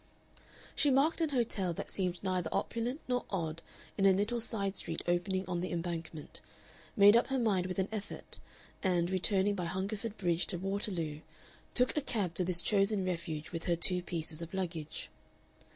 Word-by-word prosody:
She 290 Hz, -, +4 dB
marked 280 Hz, +6 st, +3 dB
an 320 Hz, -, +2 dB
hotel 220 Hz, -9 st, 0 dB
that -, -, -5 dB
seemed 180 Hz, -2 st, -1 dB
neither 185 Hz, -3 st, 0 dB
opulent 240 Hz, +5 st, -1 dB
nor 250 Hz, -1 st, 0 dB
odd 165 Hz, -4 st, -2 dB, 0.4 s
in 195 Hz, -, +6 dB
a -, -, +8 dB
little 215 Hz, +5 st, 0 dB
side 200 Hz, -4 st, 0 dB
street 165 Hz, -3 st, -2 dB
opening 185 Hz, +2 st, 0 dB
on 175 Hz, -1 st, -1 dB
the 180 Hz, -, -2 dB
Embankment, 165 Hz, -3 st, -4 dB, 0.6 s
made 205 Hz, +1 st, +8 dB
up 235 Hz, -, +4 dB
her 270 Hz, -, 0 dB
mind 200 Hz, -7 st, +2 dB
with 185 Hz, -, -4 dB
an 190 Hz, 0 st, +1 dB
effort, 215 Hz, -2 st, -6 dB, 0.4 s
and, 180 Hz, -2 st, +1 dB
returning 190 Hz, +2 st, +2 dB
by 180 Hz, -3 st, -2 dB
Hungerford 200 Hz, +5 st, -3 dB
Bridge 175 Hz, -2 st, +1 dB
to 180 Hz, -, -2 dB
Waterloo, 185 Hz, -5 st, -2 dB, 0.6 s
took 250 Hz, 0 st, +6 dB
a 300 Hz, -, +2 dB
cab 205 Hz, -10 st, -1 dB
to 180 Hz, -, +2 dB
this 175 Hz, -1 st, +2 dB
chosen 200 Hz, -1 st, +2 dB
refuge 165 Hz, -4 st, -3 dB
with 165 Hz, -1 st, -4 dB
her 170 Hz, -, +2 dB
two 180 Hz, +1 st, +2 dB
pieces 165 Hz, -2 st, -1 dB
of 170 Hz, +3 st, -6 dB
luggage. 165 Hz, -5 st, -4 dB
185 Hz, 175 wpm, -33 LUFS, 170-210 Hz, 0.6 s, a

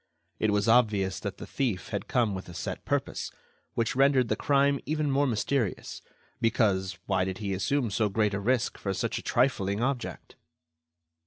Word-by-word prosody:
It 110 Hz, -, +2 dB
was 105 Hz, 0 st, +1 dB
obvious 105 Hz, -5 st, +3 dB
that -, -, -5 dB
the -, -, -7 dB
thief 115 Hz, -10 st, -2 dB
had 100 Hz, -2 st, -3 dB
come 120 Hz, -5 st, +1 dB
with 95 Hz, -1 st, -6 dB
a 85 Hz, -, -10 dB
set -, -, -4 dB
purpose, -, -, -1 dB, 0.5 s
which 115 Hz, +1 st, 0 dB
rendered 135 Hz, -2 st, +4 dB
the -, -, +2 dB
crime 140 Hz, 0 st, +2 dB
even 150 Hz, -2 st, 0 dB
more 140 Hz, +1 st, +3 dB
mysterious; 115 Hz, 0 st, -1 dB, 0.4 s
because, 100 Hz, -5 st, +1 dB
why 95 Hz, -2 st, +1 dB
did 95 Hz, 0 st, -3 dB
he 100 Hz, -3 st, -3 dB
assume 125 Hz, +4 st, 0 dB
so 105 Hz, +1 st, +1 dB
great 105 Hz, 0 st, +1 dB
a 100 Hz, -, -1 dB
risk 120 Hz, +3 st, 0 dB
for 100 Hz, -1 st, -2 dB
such -, -, -1 dB
a -, -, -8 dB
trifling 105 Hz, -6 st, +1 dB
object? 130 Hz, -2 st, -3 dB
110 Hz, 175 wpm, -28 LUFS, 100-130 Hz, 0.5 s, rendered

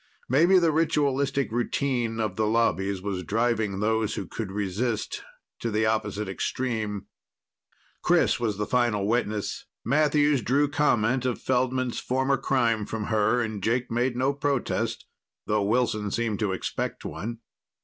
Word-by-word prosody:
Maybe 170 Hz, +9 st, +5 dB
the 170 Hz, -3 st, +4 dB
ritualistic 140 Hz, -4 st, +1 dB
routine 120 Hz, -1 st, -1 dB
of 105 Hz, -4 st, -1 dB
the 110 Hz, -1 st, +1 dB
Lobbies 100 Hz, -4 st, +1 dB
was 100 Hz, -3 st, -2 dB
driving 110 Hz, +1 st, 0 dB
those 110 Hz, 0 st, +1 dB
who 100 Hz, -, -4 dB
could 100 Hz, +3 st, -5 dB
resist 105 Hz, +3 st, -2 dB, 0.4 s
to 115 Hz, -, -2 dB
the 110 Hz, 0 st, +1 dB
opposite 105 Hz, -1 st, -1 dB
extreme. 105 Hz, 0 st, -2 dB, 1.0 s
Chris -, -, +3 dB
was 110 Hz, -4 st, -1 dB
the 105 Hz, -, -1 dB
final 115 Hz, -4 st, +1 dB
witness. 110 Hz, -2 st, -1 dB, 0.2 s
Matthews 145 Hz, 0 st, +3 dB
drew 140 Hz, +6 st, +2 dB
comment 130 Hz, -5 st, +2 dB
of 125 Hz, -2 st, -1 dB
Feldman's 130 Hz, -1 st, 0 dB
former 130 Hz, +2 st, +1 dB
crime 115 Hz, -5 st, +1 dB
from 110 Hz, -1 st, -3 dB
her, 110 Hz, +3 st, +3 dB
and 110 Hz, -3 st, -3 dB
Jake 120 Hz, +4 st, 0 dB
made 120 Hz, +2 st, +1 dB
no 130 Hz, +3 st, +1 dB
protest, 140 Hz, -2 st, -1 dB, 0.4 s
though 105 Hz, 0 st, +1 dB
Wilson 105 Hz, -1 st, +1 dB
seemed 110 Hz, 0 st, -1 dB
to 105 Hz, -3 st, 0 dB
expect 95 Hz, -, -3 dB
one. 115 Hz, +3 st, -5 dB
115 Hz, 140 wpm, -26 LUFS, 105-130 Hz, 1.0 s, Maybe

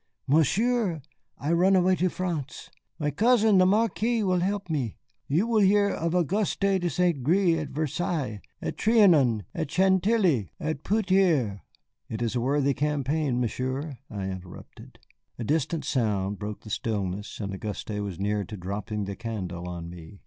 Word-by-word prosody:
"Monsieur, 175 Hz, -, +2 dB, 0.3 s
I 150 Hz, -, -2 dB
run 185 Hz, +3 st, +4 dB
away 185 Hz, 0 st, +4 dB
to 185 Hz, +2 st, +2 dB
France. 165 Hz, -7 st, -4 dB, 0.3 s
My 150 Hz, -2 st, -1 dB
cousin 220 Hz, -, +4 dB
the 185 Hz, -, +5 dB
Marquis 225 Hz, +2 st, +1 dB
will 185 Hz, -2 st, +2 dB
help 195 Hz, +1 st, -1 dB
me. 140 Hz, -, -2 dB, 0.3 s
You 165 Hz, +10 st, +2 dB
will 230 Hz, -2 st, +2 dB
hear 200 Hz, +1 st, +4 dB
of 170 Hz, -1 st, -1 dB
Auguste 185 Hz, +4 st, 0 dB
de 190 Hz, -3 st, +2 dB
St. 170 Hz, -3 st, +1 dB
Gré 170 Hz, +2 st, +3 dB
at 150 Hz, -, -5 dB
Versailles, 150 Hz, -, -2 dB, 0.2 s
at -, -, -3 dB
Trianon, 165 Hz, -, +4 dB
at 160 Hz, -3 st, -3 dB
Chantilly, 190 Hz, -, +2 dB
and 155 Hz, -2 st, -3 dB
peut 215 Hz, +1 st, +1 dB
être 150 Hz, -, +3 dB, 0.2 s
" -, -, -54 dB
"It 110 Hz, +1 st, -3 dB
is 115 Hz, +1 st, -1 dB
a 120 Hz, -, +1 dB
worthy 140 Hz, +2 st, +2 dB
campaign, 145 Hz, -2 st, 0 dB
Monsieur," 130 Hz, +4 st, -3 dB
I 100 Hz, -3 st, -4 dB
interrupted. 95 Hz, -1 st, -9 dB, 0.4 s
A 120 Hz, -, -4 dB
distant 155 Hz, +5 st, -1 dB
sound 105 Hz, -6 st, 0 dB
broke 105 Hz, 0 st, -5 dB
the 110 Hz, -, -10 dB
stillness, 100 Hz, -2 st, -3 dB
and 100 Hz, -2 st, -4 dB
Auguste 105 Hz, +2 st, -5 dB
was 100 Hz, -4 st, -5 dB
near 105 Hz, +1 st, 0 dB
to 105 Hz, +3 st, -8 dB
dropping 100 Hz, +3 st, -4 dB
the 100 Hz, 0 st, -5 dB
candle 90 Hz, -6 st, -5 dB
on 85 Hz, -1 st, -6 dB
me. 85 Hz, +2 st, -11 dB
150 Hz, 165 wpm, -27 LUFS, -, 0.4 s, the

